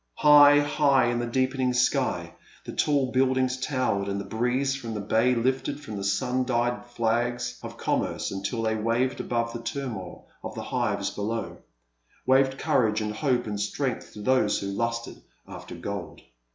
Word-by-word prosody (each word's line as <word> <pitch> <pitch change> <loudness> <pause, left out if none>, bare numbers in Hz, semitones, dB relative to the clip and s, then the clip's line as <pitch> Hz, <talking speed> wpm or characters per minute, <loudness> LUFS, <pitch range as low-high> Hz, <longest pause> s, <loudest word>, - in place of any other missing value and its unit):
High, 145 -1 +7
high, 140 -4 +3
in 120 - -1
the 120 - -2
deepening 130 +1 0
sky 125 0 +1 0.3
the - - -6
tall 140 -3 +1
build 130 0 +2
ings 130 -1 +1
towered, 130 -7 -1
and 100 0 -2
the 100 - -5
breeze 125 +4 0
from 115 -5 -6
the - - -3
bay 115 +5 +2
lifted 130 +4 0
the 110 -10 -6
sun 125 +6 0
dyed 120 -1 -1
flags 120 +1 -1
of - - -8
commerce - - -1
until 100 +4 -3
they 110 0 +1
waved 115 +4 0
above 115 -1 -1
the 120 - -5
turmoil 115 -7 -6 0.2
of - - -6
the - - -5
hives - - -1
below 110 +3 -4 0.3
— - - -37
waved 135 +1 +3
courage 110 -5 +2
and 105 -1 -2
hope 125 0 0
and 105 -2 -4
strength 125 +5 -3
to 105 - -8
those 130 -4 +3
who 100 - -4
lusted 115 +3 -3 0.3
after - - -9
gold. - - -6
120 Hz, 170 wpm, -26 LUFS, 110-130 Hz, 0.3 s, High